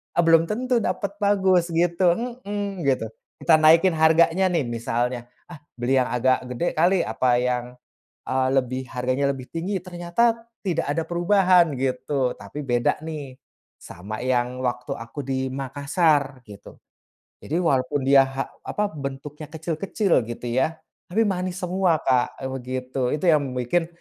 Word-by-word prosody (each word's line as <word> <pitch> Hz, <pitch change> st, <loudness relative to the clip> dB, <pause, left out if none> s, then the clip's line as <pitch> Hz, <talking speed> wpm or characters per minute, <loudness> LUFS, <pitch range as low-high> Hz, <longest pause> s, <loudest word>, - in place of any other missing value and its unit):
eee, 175 Hz, -, +4 dB
belum 165 Hz, 0 st, +6 dB
tentu 250 Hz, +3 st, 0 dB
dapat 200 Hz, +2 st, -2 dB
bagus 190 Hz, -4 st, +3 dB
gitu 170 Hz, +1 st, +2 dB, 0.3 s
mhm, 200 Hz, -3 st, -4 dB
gitu. 130 Hz, -5 st, +1 dB, 0.4 s
Kita 165 Hz, -, +6 dB
naikin 165 Hz, +3 st, +5 dB
harganya 165 Hz, +4 st, +4 dB
nih, 160 Hz, -7 st, 0 dB
misalnya, 120 Hz, +1 st, -2 dB, 0.3 s
"Ah, 145 Hz, -, -21 dB
beli 125 Hz, +3 st, 0 dB
yang 125 Hz, -, 0 dB
agak 130 Hz, +1 st, +2 dB
gede 125 Hz, +8 st, -2 dB
kali, 175 Hz, +3 st, +3 dB
apa 125 Hz, +3 st, 0 dB
yang, 125 Hz, -1 st, 0 dB, 0.7 s
eee, 130 Hz, 0 st, +1 dB
lebih 130 Hz, 0 st, 0 dB
harganya 130 Hz, +2 st, 0 dB
lebih 130 Hz, -1 st, -9 dB
tinggi," 180 Hz, +3 st, -3 dB
ternyata 180 Hz, +6 st, 0 dB, 0.3 s
tidak 165 Hz, -3 st, 0 dB
ada 165 Hz, -, 0 dB
perubahan, 175 Hz, -2 st, +3 dB
gitu. 130 Hz, 0 st, -1 dB
Tapi 150 Hz, -, -8 dB
beda, 120 Hz, +3 st, +1 dB
nih, 145 Hz, -5 st, -7 dB, 0.4 s
sama 105 Hz, +6 st, -8 dB
yang 125 Hz, 0 st, 0 dB
waktu 125 Hz, 0 st, -2 dB
aku 115 Hz, +6 st, -7 dB
di 130 Hz, -1 st, -2 dB
Makassar 140 Hz, 0 st, 0 dB
gitu. 100 Hz, -1 st, -13 dB, 0.7 s
Jadi 160 Hz, -, -2 dB
walaupun 140 Hz, -3 st, +1 dB
dia 135 Hz, -1 st, +7 dB
ha 135 Hz, 0 st, -3 dB, 0.2 s
apa, 210 Hz, 0 st, -1 dB
bentuknya 145 Hz, +1 st, -7 dB
kecil-kecil 165 Hz, -, 0 dB
gitu 120 Hz, +1 st, -6 dB
ya, 135 Hz, +7 st, +1 dB, 0.4 s
tapi 215 Hz, +6 st, +1 dB
manis 185 Hz, -1 st, -3 dB
semua, 180 Hz, -3 st, +1 dB
Kak, 125 Hz, -1 st, +1 dB, 0.2 s
begitu. 130 Hz, +1 st, -3 dB
Itu 165 Hz, -, -4 dB
yang 145 Hz, -5 st, +2 dB
bikin, 130 Hz, +7 st, 0 dB
150 Hz, 145 wpm, -24 LUFS, 130-175 Hz, 0.7 s, dia